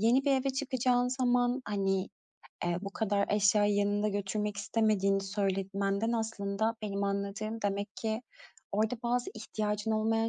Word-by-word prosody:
yeni 245 +5 +4
bir 280 - +4
eve 270 0 +2
çıkacağın 255 -2 +1
zaman, 250 0 +2
hani, 195 -1 0 0.6
eee, 175 0 0
bu 200 - -4
kadar 205 -1 0
eşyayı 205 0 +4
yanında 205 +1 +2
götürmek 205 +1 -2
istemediğini 200 -2 +2
söyletmenden 195 +2 0
aslında 220 -1 -1
benim 200 -1 -1
anladığım, 200 +3 -2
demek 200 0 -2
ki 220 +1 -2 0.5
orada 220 +4 +1
bazı 245 +1 0
ihtiyacın 215 0 -2
olmayan 225 +1 +2
210 Hz, 135 wpm, -31 LUFS, 200-230 Hz, 0.6 s, yeni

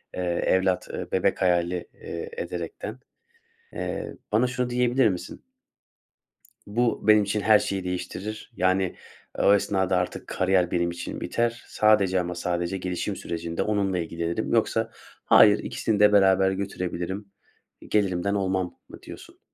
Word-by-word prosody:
eee, - - -5 0.3
evlat, 95 -1 +1 0.2
bebek - - +1
hayali, 90 -1 +1
eee, 455 - -7
ederekten, 480 - -5 0.7
eee, - - -4 0.2
bana 115 +4 +4
şunu 125 0 -2
diyebilir 125 0 +3
misin? 90 -3 -5 1.3
"Bu, 115 +2 0
benim 105 -1 +7
için 105 +1 -1
her 105 +1 +6
şeyi 95 -1 -3
değiştirir. 90 +5 -5
Yani, 95 -1 +1 0.4
o 100 - +5
esnada 95 -2 +1
artık 90 0 -3
kariyer 90 -1 +1
benim 85 -1 +1
için 85 - -6
biter. 120 0 -1
Sadece 100 -4 +3
ama 90 0 -3
sadece 85 +1 -2
gelişim 90 -1 -3
sürecinde 85 0 -4
onunla 100 -3 0
ilgilenirim." 85 0 -3
Yoksa - - +1 0.3
"Hayır, 105 -1 +7
ikisini 110 -2 -2
de 105 0 +6
beraber 95 -1 +5
götürebilirim, 95 0 -4 0.6
gelirimden 100 -1 +1
olmam." 95 -2 -1
mı - - -12
diyorsun? - - -12
95 Hz, 130 wpm, -25 LUFS, 90-105 Hz, 1.3 s, benim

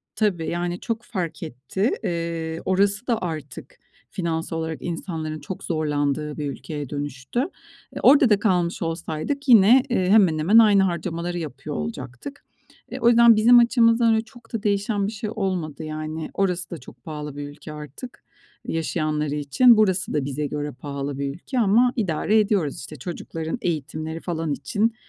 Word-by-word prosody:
Tabii. 185 -7 0
Yani, 175 +1 -2
çok 230 0 -3
fark 180 -10 -4
etti. 155 - -2
Eee, 165 -3 -3
orası 200 +4 +1
da 230 -3 0
artık 155 -6 -6 0.3
finansal 165 -2 -3
olarak 160 -1 -4
insanların 160 -3 -4
çok 190 - -7
zorlandığı 150 -2 -1
bir 145 -2 -2
ülkeye 145 -1 -6
dönüştü. 145 - -4 0.6
E, - - -4
orada 275 -2 +7
da 210 -2 +4
kalmış 180 -5 +1
olsaydık 165 - -3
yine, 235 +2 +7
eee, 185 -7 +1
hemen 190 -7 +5
hemen 185 +9 +4
aynı 210 -4 +6
harcamaları 175 -1 -2
yapıyor 145 -5 -6
olacaktık. 125 - -6 0.5
E, 260 - -5
o 235 - +2
yüzden 235 -1 +7
bizim 240 +3 +7
açımızdan 230 -1 +4
öyle 220 0 +1
çok 240 -1 -18
da 225 -2 -3
değişen 205 0 0
bir - - -3
şey 215 0 -5
olmadı 175 -7 -2
yani. 155 +1 -5
Orası 180 -2 -1
da 170 - -6
çok 120 -3 -15
pahalı 150 -2 -6
bir 145 0 -6
ülke 150 +1 -10
artık 150 - -10 0.4
yaşayanları 155 -2 -1
için. 180 - +5
Burası 190 -3 +2
da 145 -3 0
bize 145 +1 -2
göre 150 0 -4
pahalı 140 +1 -5
bir 140 0 -2
ülke 250 - -4
ama 235 +4 +4
idare 210 - +1
ediyoruz, 200 -9 +1
işte. 140 +4 -9
Çocukların 160 - -5
eğitimleri 155 - -3
falan 165 -3 -2
için, 210 - -1
170 Hz, 160 wpm, -23 LUFS, 150-210 Hz, 0.6 s, orada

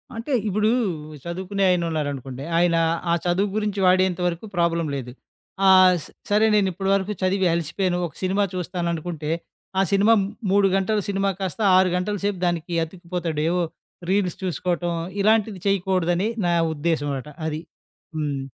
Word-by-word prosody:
అంటే, 230 +6 -5 0.2
ఇప్పుడు 210 +2 +1 0.6
చదువుకునే 190 +3 -3
ఆయన 180 -1 +2
ఉన్నారనుకోండి. 140 -4 -4
ఆయన 175 -1 +3 0.4
ఆ - - +4
చదువు 190 +3 +1
గురించి 210 -2 -1
వాడేంత 185 0 +3
వరకు 175 +4 -3
ప్రాబ్లమ్ 170 -2 +1
లేదు. 125 -2 -5 0.6
ఆహ్, 185 -1 +7 0.3
సరే 210 +2 +4
నేనిప్పడు 195 -1 +1
వరకు 195 +2 -1
చదివి 185 0 +2
అలిసిపోయాను. 175 +2 -1
ఒక 155 - -16
సినిమా 195 +2 +2
చూస్తాను 180 -1 -3
అనుకుంటే 160 -2 -4 0.5
ఆ - - +5
సినిమా 200 +3 +5 0.4
3 200 0 +4
గంటల 200 +2 +1
సినిమా 195 0 0
కాస్త 190 +3 -4 0.2
6 185 0 +4
గంటల 205 +3 -1
సేపు 205 -2 0
దానికి 175 0 -1
అతికిపోతాడు. 170 -2 -4
ఏవో 180 0 +1 0.5
రీల్స్ 190 -3 +1
చూసుకోవటం 175 -1 -1 0.3
ఇలాంటివి 215 -2 +2
చేయకూడదని 185 -1 +1 0.2
నా 175 - +2 0.2
ఉద్దేశ్యం 145 -2 -1
అట 150 - -10 0.2
అది. 155 +1 -3 0.5
హ్మ్. 145 -3 -2
180 Hz, 140 wpm, -23 LUFS, 170-195 Hz, 0.6 s, ఆహ్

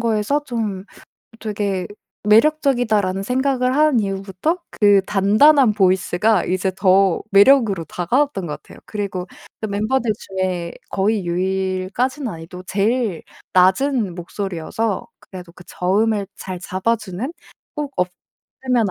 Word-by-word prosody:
거에서 230 +5 0
'좀 215 -6 -3 0.5
되게 205 -4 -2 0.4
매력적이다.'라는 220 -6 +3
생각을 255 +2 0
한 300 -4 +4
이후부터 195 - -2
그 205 -2 +4
단단한 215 +6 +5
보이스가 190 +1 +2
이제 185 +1 0
더 190 -1 +3
매력으로 200 -3 +5
다가왔던 195 - -1
것 150 - -6
같아요. - - -15
그리고 195 -4 -4 0.3
그 220 - -2
멤버들 215 +3 0
중에 185 -3 -3 0.2
거의 200 0 0
유일까지는 190 +9 -1
아니어도 170 +1 -9
제일 210 -1 0 0.3
낮은 190 +3 +3
목소리여서 190 +3 -3
그래도 180 -2 -11
그 180 - -15
저음을 205 +3 0
잘 185 -1 -6
잡아주는 215 - -2 0.4
꼭 295 -2 -4
없으면 200 +6 -2
200 Hz, 285 characters per minute, -20 LUFS, 185-235 Hz, 0.5 s, 단단한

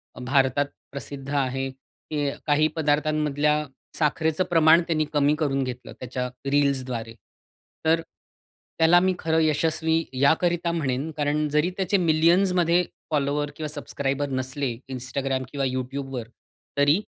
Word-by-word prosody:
अ, - - -10
भारतात 135 +2 +2 0.3
प्रसिद्ध 140 0 -7
आहे 135 -1 0
की 145 +2 -5 0.2
काही 155 +1 +3
पदार्थांमधल्या 150 -1 +1 0.3
साखरेचं 160 +2 +1
प्रमाण 165 0 +6
त्यांनी 155 -2 +1
कमी 145 +1 +3
करून 135 -3 +1
घेतलं 125 0 -6
त्याच्या 125 0 -3 0.2
रील्सद्वारे. 130 -5 0 0.7
तर 165 +1 +3 0.8
त्याला 165 +2 +6
मी 185 +1 +2
खरं 160 0 +1
यशस्वी 160 +1 +1
याकरिता 170 +5 +2
म्हणेन 145 -2 -1
कारण 150 +1 +1
जरी 150 +4 +2
त्याचे 195 +1 +1
मिलियन्समध्ये 175 +1 +3 0.3
फॉलोवर 145 0 0
किंवा 155 0 -4
सब्सक्राइबर 140 -1 -3
नसले 130 0 -2 0.2
Instagram 130 +1 -2
किंवा 140 -2 -1
YouTubeवर 130 -1 -4 0.5
तरी 145 +5 +4
145 Hz, 120 wpm, -25 LUFS, 135-160 Hz, 0.8 s, प्रमाण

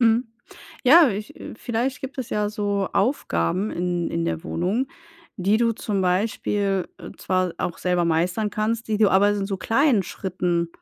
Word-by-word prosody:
Mhm, 230 +1 +3 0.6
ja, 305 +4 +8
ich, 210 +1 -6
äh - - -8
vielleicht 240 +4 -2
gibt 270 0 -7
es 250 - -4
ja 210 0 0
so 205 -2 -1
Aufgaben 195 - 0
in 175 -1 -2
in 165 0 -1
der 165 0 -3
Wohnung, 195 +10 -1 0.5
die 200 +2 +2
du 230 0 +2
zum 210 -3 -2
Beispiel, 195 0 0
äh, - - -9
zwar 185 -2 0
auch 170 - -3
selber 180 -1 +1
meistern 175 +6 0
kannst, 220 +2 -2
die 215 -1 0
du 215 -2 +5
aber 200 +2 +5
in 205 -1 -1
so 195 -1 -3
kleinen 235 0 +2
Schritten, 180 -2 -2
205 Hz, 170 wpm, -23 LUFS, 180-225 Hz, 0.6 s, ja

